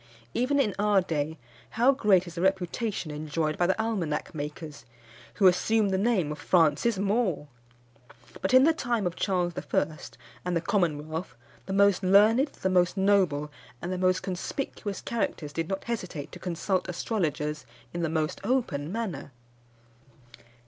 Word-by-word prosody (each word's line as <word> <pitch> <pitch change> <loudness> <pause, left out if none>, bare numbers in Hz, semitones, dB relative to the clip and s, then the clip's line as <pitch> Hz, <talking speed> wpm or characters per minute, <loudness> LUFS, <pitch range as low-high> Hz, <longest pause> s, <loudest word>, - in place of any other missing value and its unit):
Even 275 +4 +1
in 215 -8 +2
our 205 -1 +4
day, 160 -3 -2 0.4
how 245 +4 +6
great 205 -9 +3
is 170 - -9
the 170 - -4
reputation 190 -1 -1
enjoyed 155 +1 -2
by 175 - +1
the 190 - +1
almanac 190 -10 -2
makers, 150 0 -6 0.5
who 200 - +2
assume 205 +3 +4
the 190 - 0
name 195 -8 +1
of 150 - -6
Francis 180 +6 +3
Moore! 195 -7 0 0.9
But 190 - 0
in 255 +1 +7
the 325 +3 +5
time 240 -9 -1
of 175 -1 -2
Charles 180 -3 0
I. 155 +1 -1 0.5
and 180 -1 0
the - - -1
Commonwealth 160 -4 -1 0.3
the 190 - -3
most 200 -1 +4
learned, 210 +8 +5
the 235 - -4
most 180 +1 +2
noble, 185 -7 +2 0.3
and 175 +6 -4
the 185 - -3
most 185 0 +2
conspicuous 200 +2 -4
characters 165 -10 -3
did 165 +1 -3
not 195 0 -3
hesitate 180 -11 -5
to - - -10
consult 180 +1 -2
astrologers 155 -6 -2 0.3
in 175 - -3
the 165 - 0
most 155 -1 -2
open 190 - -1
manner. 195 -11 -4
185 Hz, 155 wpm, -27 LUFS, 160-210 Hz, 0.9 s, in